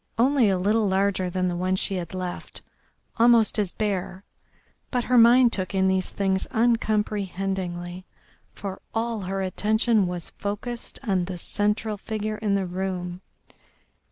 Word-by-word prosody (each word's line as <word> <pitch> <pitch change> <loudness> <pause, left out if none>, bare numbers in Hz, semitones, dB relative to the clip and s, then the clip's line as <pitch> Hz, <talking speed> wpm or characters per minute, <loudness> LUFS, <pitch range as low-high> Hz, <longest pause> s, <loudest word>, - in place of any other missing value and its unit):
Only 250 -1 +4
a 190 - +2
little 210 +3 +2
larger 190 -1 +1
than 185 +1 -1
the 175 - -1
one 185 +1 0
she 190 - -1
had 175 0 -5
left, 180 -1 -5 0.5
almost 230 -2 +5
as 200 -4 0
bare, 195 -2 -3 0.7
but 245 -2 0
her 250 - +1
mind 240 +1 +6
took 185 0 -2
in 190 0 +3
these 190 -1 +1
things 190 -1 -1
uncomprehendingly, 195 -5 -1 0.4
for 195 -2 -7
all 230 0 -1
her 195 0 -3
attention 215 +2 +2
was 175 -2 -5
focussed 210 +4 -4
on 190 -7 +1
the 180 0 -5
central 210 +3 -1
figure 215 +1 -4
in 205 -2 0
the 195 -1 0
room. 180 -1 -4
195 Hz, 145 wpm, -25 LUFS, 185-220 Hz, 0.7 s, mind